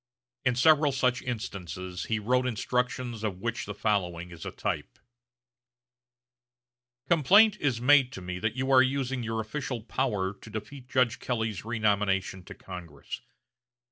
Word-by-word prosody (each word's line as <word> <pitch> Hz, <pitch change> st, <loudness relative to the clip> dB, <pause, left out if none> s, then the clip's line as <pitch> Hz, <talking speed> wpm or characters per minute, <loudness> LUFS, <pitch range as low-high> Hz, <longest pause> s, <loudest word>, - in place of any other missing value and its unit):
In 125 Hz, -1 st, +2 dB
several 150 Hz, +2 st, +5 dB
such 130 Hz, -1 st, +1 dB
instances 95 Hz, -6 st, -5 dB
he 110 Hz, -, 0 dB
wrote 125 Hz, +4 st, +1 dB
instructions 125 Hz, 0 st, -1 dB
of 100 Hz, -4 st, -2 dB
which 115 Hz, +3 st, -3 dB
the 105 Hz, -, -5 dB
following 90 Hz, -5 st, -1 dB
is 85 Hz, -1 st, -8 dB
a -, -, -4 dB
type: -, -, -3 dB, 2.1 s
"Complaint 195 Hz, +7 st, +6 dB
is 135 Hz, -6 st, 0 dB
made 135 Hz, 0 st, +5 dB
to -, -, -6 dB
me 90 Hz, 0 st, -5 dB
that 110 Hz, +3 st, -1 dB
you 130 Hz, +1 st, -1 dB
are 130 Hz, -1 st, +8 dB
using 130 Hz, -1 st, 0 dB
your 115 Hz, -1 st, -2 dB
official 120 Hz, +1 st, -4 dB
power 105 Hz, -6 st, -1 dB
to 100 Hz, +3 st, -14 dB
defeat 110 Hz, +5 st, -7 dB
Judge 125 Hz, -3 st, +2 dB
Kelley's 110 Hz, -5 st, -2 dB
renomination 100 Hz, -4 st, 0 dB
to -, -, -10 dB
Congress.... 90 Hz, -3 st, -8 dB
115 Hz, 140 wpm, -28 LUFS, 100-130 Hz, 2.1 s, are